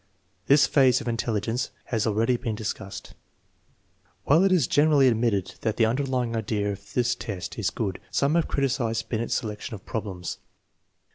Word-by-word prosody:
This 140 0 +6
phase 130 -3 +4
of - - -8
intelli 115 -3 -1
gence 115 +4 -2 0.2
has 115 -2 -1
already 110 +4 +2
been 115 -2 -3
discussed. 105 -2 -6 1.1
1 150 +4 +4
While - - +4
it 195 - +3
is 175 -8 +4
generally 145 -1 +4
admitted 115 -5 +1
that 110 -2 -1
the 115 - +4
underlying 125 -1 -1
idea 105 -2 -1
of 100 0 -10
this 120 -1 +2
test 100 -5 -6
is 100 -4 +1
good, 100 -5 -3
some 140 +2 +1
have 170 -1 +2
criticized 120 -5 -1
Binet's 115 0 -1
selection 110 0 -4
of 95 - -13
problems. 95 -6 -5
115 Hz, 165 wpm, -26 LUFS, 105-130 Hz, 1.1 s, This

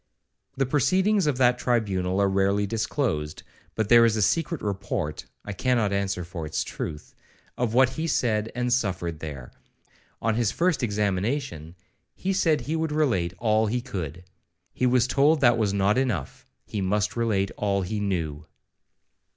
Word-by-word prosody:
The 135 - +2
proceedings 185 - +2
of 145 -4 +1
that 125 -1 +3
tribunal 95 -6 0
are 100 - +3
rarely 100 +1 +1
disclosed, 100 - -2 0.3
but 110 -2 0
there 120 +1 +7
is 115 -1 +3
a - - +1
secret 165 - 0
report 95 -6 -3 0.2
(I 100 - -4
cannot 115 0 +1
answer 100 -2 -1
for 85 -1 -7
its 75 - -1
truth) 75 -1 -6 0.4
of 120 -2 -1
what 130 0 +5
he 160 +5 -4
said 110 -7 0
and 125 0 0
suffered 90 -9 -1
there. 70 -6 -7 0.7
On 115 +1 0
his 115 -1 +1
first 175 -3 +1
examination, 100 - -2 0.4
he 195 - -2
said 160 -5 +2
he 155 - -3
would 160 -1 -1
relate 115 - 0
all 110 -1 +2
he 120 +4 0
could. 90 - -6 0.5
He 125 - +1
was 125 -1 +3
told 145 +4 +3
that 120 -2 +5
was 105 -3 +1
not 100 +4 +2
enough, 110 - -3 0.2
he 105 - -4
must 105 +2 0
relate 105 -5 0
all 100 -2 0
he 105 +4 -3
knew. 80 -7 -3
110 Hz, 160 wpm, -25 LUFS, 95-125 Hz, 0.7 s, there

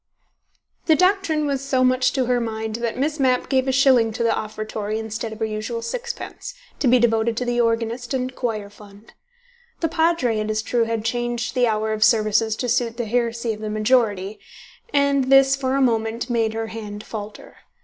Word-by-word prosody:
The 320 - +6
doctrine 365 -3 +2
was 275 -2 -1
so 265 -2 +1
much 255 0 +3
to 260 -2 +1
her 245 0 +1
mind 220 -1 -3
that 235 0 -3
Miss 295 +3 -1
Mapp 255 -2 +2
gave 265 -1 +1
a - - +2
shilling 260 -4 +4
to 235 +1 -2
the 230 - +2
offertory 215 0 -4
instead 220 0 -4
of 220 - -8
her 220 - -1
usual 220 +2 -4
sixpence, 485 - -6 0.2
to 270 - +1
be 250 +1 +6
devoted 225 -1 +1
to 250 - -1
the 240 0 +1
organist 230 +1 -1
and 255 0 -3
choir 215 -4 -3
fund. 205 +1 -16 0.7
The 330 - 0
Padre, 320 -9 +1
it 215 0 -2
is 215 0 -1
true, 235 0 +1
had 225 -1 -3
changed 240 0 -2
the 250 -2 +2
hour 220 0 0
of 215 0 +1
services 215 0 +3
to 250 - -3
suit 240 -1 0
the 240 - -2
heresy 235 0 -1
of 210 - -9
the 215 - -4
majority, 215 -3 +1 0.5
and 280 -3 +2
this 270 0 +5
for 265 -1 -1
a 275 - +2
moment 230 0 0
made 225 -2 0
her 225 0 -2
hand 210 -2 -7
falter. 210 -1 -8
235 Hz, 195 wpm, -22 LUFS, 220-260 Hz, 0.7 s, The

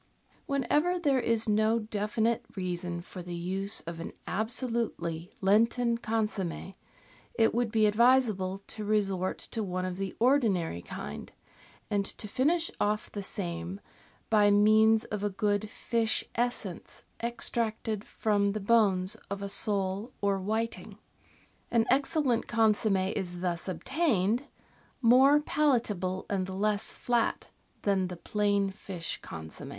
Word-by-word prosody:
Whenever 295 +6 +1
there 285 -6 +2
is 230 -2 +1
no 215 +2 +3
definite 220 +1 -1
reason 175 -2 -3
for 180 - -9
the 175 0 -6
use 190 +4 -1
of 165 +1 -7
an 165 - -6
absolutely 220 -7 -2
Lenten 230 +4 +3
consomm^, 210 -5 -2 0.6
it 225 -1 +3
would 235 -1 0
be 220 -1 +3
advisable 210 -4 +3
to 215 - -6
resort 195 -3 0
to 225 - -5
one 185 -2 -2
of 185 -1 -4
the 195 -1 -4
ordinary 215 - +2
kind, - - -7 0.6
and 200 -1 +2
to 210 - -6
finish 320 +10 +1
off 210 +1 0
the 205 - -4
same 175 -1 -3 0.5
by 210 -2 +5
means 215 +2 +5
of 210 -1 -4
a 205 - +1
good 205 +1 0
fish 225 0 +1
essence 235 -7 -3 0.2
extracted 225 -2 -2
from 205 -3 0
the 215 - -2
bones 200 -3 +2
of 200 0 -4
a 200 - -3
sole 200 +2 0
or 200 -1 +1
whiting. 220 +4 -3 0.7
An 230 -1 +3
excellent 275 -2 +2
consomm6 210 -4 +2
is 175 -1 -4
thus 175 -1 -1
obtained, 235 - 0 0.5
more 265 +4 +6
palatable 220 -12 0
and 190 -2 -2
less 205 +2 0
flat 240 -1 -1 0.3
than 195 -2 +2
the 180 -1 -7
plain 200 +1 0
fish 185 -3 -5
con 80 0 -8
somm^. - - -8
210 Hz, 130 wpm, -29 LUFS, 190-230 Hz, 0.7 s, more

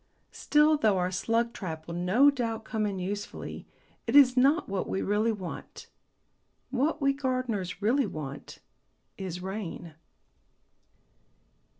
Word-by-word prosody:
Still, 300 +1 +3
though 215 -8 +3
our 180 0 0
slug 230 +5 0
trap 160 -7 -6
will 170 - -6
no 190 +12 +4
doubt 230 -5 -3
come 215 -2 -1
in 200 -2 -3
usefully, 200 +3 -5 0.4
it - - 0
is 265 -3 +8
not 275 +7 +3
what 195 -1 -3
we 190 - -1
really 210 +3 +1
want. 185 -6 -7 0.9
What 285 +3 0
we 275 0 +4
gardeners 250 -9 -2
really 245 +3 +3
want 145 -6 -7 0.6
is 180 -2 -6
rain. 190 -4 -6
215 Hz, 125 wpm, -28 LUFS, 185-255 Hz, 0.9 s, is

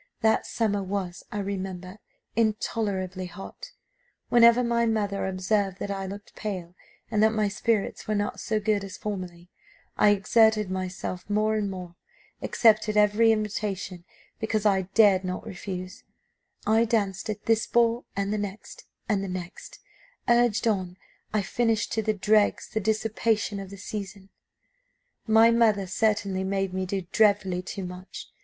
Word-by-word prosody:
That 220 0 +2
summer 205 -3 0
was, 190 -2 -4
I - - -4
remember, 190 -1 -5 0.4
intolerably 200 -4 -1
hot. 200 - -10 0.6
Whenever 235 +1 +6
my 235 -1 +1
mother 205 -3 0
observed 190 +1 0
that 200 - -4
I 195 -1 -3
looked 200 +2 -9
pale, 185 -5 -5 0.4
and 210 -2 +2
that 220 0 +5
my 215 -1 +2
spirits 210 +1 -1
were 215 - 0
not 205 0 -2
so 220 -2 -1
good 210 -1 0
as 190 -1 -8
formerly, 180 -4 -6 0.5
I 210 - +5
exerted 210 0 +3
myself 185 0 -4
more 215 +1 +2
and 210 -2 0
more; 180 -2 -8 0.4
accepted 215 -2 +3
every 210 +2 +5
invitation 205 -4 -2 0.4
because 220 -1 -1
I 190 -3 +2
dared 200 -4 +6
not 185 +2 -4
refuse; 185 -3 -7 0.6
I 220 +2 +4
danced 205 -4 -1
at 210 -1 -4
this 225 -1 +2
ball, 235 0 +2
and 200 +1 -1
the 215 - -1
next, 205 +1 -7 0.2
and 205 -4 +1
the 195 - -4
next; 180 -1 -7 0.5
urged 235 -2 +3
on, 185 -4 -1 0.3
I 215 -1 +1
finished 225 +2 0
to 220 - 0
the 215 0 0
dregs 210 +1 +2
the 220 - +1
dissipation 220 0 0
of 195 -1 -7
the 200 - -10
season. 200 -1 -7 1.0
"My 225 +1 +6
mother 220 -4 +3
certainly 200 -1 0
made 195 -1 -1
me 185 0 -2
do 195 0 -2
dreadfully 200 -4 +3
too 185 +1 -6
much. 180 +1 -9
205 Hz, 150 wpm, -26 LUFS, 190-220 Hz, 1.0 s, Whenever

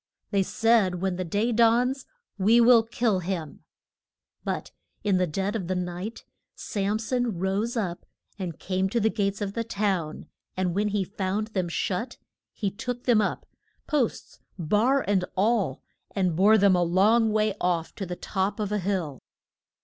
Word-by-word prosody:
They 200 -2 +3
said 215 -1 +2
when 190 -1 -1
the 185 - -2
day 205 +7 0
dawns 240 +4 +3 0.3
we 220 +5 +5
will 235 0 +7
kill 225 -3 0
him. 170 -5 -5 0.8
But - - -3 0.3
in 200 -3 +2
the 180 0 +1
dead 195 +6 -2
of 190 -6 -3
the 185 - -1
night 180 +5 -5 0.3
Sam 205 +1 -2
son 235 -2 -1
rose 200 +6 -1
up 180 -6 -3 0.3
and 175 -4 -4
came 190 0 -1
to 235 - 0
the 220 0 +2
gates 200 -1 -1
of 200 -1 -2
the 230 - -2
town, 195 -8 -2 0.3
and 185 -2 0
when 205 +3 +1
he 205 -1 0
found 200 +2 -3
them 185 -5 -2
shut 185 +7 -2 0.3
he 200 -3 -2
took 245 +4 -5
them 235 -4 +4
up 205 - -2 0.4
posts, 285 -7 -1 0.2
bar 215 - +2
and 195 -2 +2
all 200 - +1 0.3
and 185 -4 +1
bore 205 +5 +6
them 200 -2 +5
a 180 - +2
long 210 +6 +3
way 215 -1 +2
off 170 -2 0
to 195 - -5
the 180 - -4
top 195 +3 -2
of 210 -1 -2
a 210 - 0
hill. 180 -8 -2
200 Hz, 170 wpm, -26 LUFS, 185-225 Hz, 0.8 s, will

